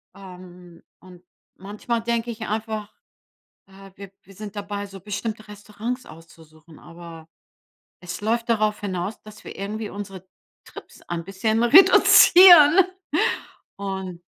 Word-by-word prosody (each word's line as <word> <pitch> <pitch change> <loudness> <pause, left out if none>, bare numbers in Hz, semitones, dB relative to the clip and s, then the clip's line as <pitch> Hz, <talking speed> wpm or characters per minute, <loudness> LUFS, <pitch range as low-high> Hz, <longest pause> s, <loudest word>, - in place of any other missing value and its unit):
Ähm, 180 -2 -15 0.2
und 180 -1 -17 0.3
manchmal 210 +4 -5
denke 235 0 -2
ich 220 0 -8
einfach, 215 -1 -5 0.7
äh, 195 0 -16
wir 200 -1 -12
wir 195 - -19
sind 210 +1 -10
dabei, 205 0 -6
so 195 -1 -13
bestimmte 210 +2 -6
Restaurants 210 +4 -7
auszusuchen. 160 -1 -17
Aber 165 -1 -13 0.7
es 180 -1 -8
läuft 230 +3 -2
darauf 215 -2 0
hinaus, 195 0 -5
dass 215 0 -15
wir - - -10
irgendwie 210 +2 -6
unsere 195 -2 -10 0.4
Trips - - -15
ein 170 -1 -6
bisschen 220 +4 -2
reduzieren. 350 +2 +7 0.9
Und 190 -3 -7
205 Hz, 120 wpm, -22 LUFS, 185-220 Hz, 0.9 s, reduzieren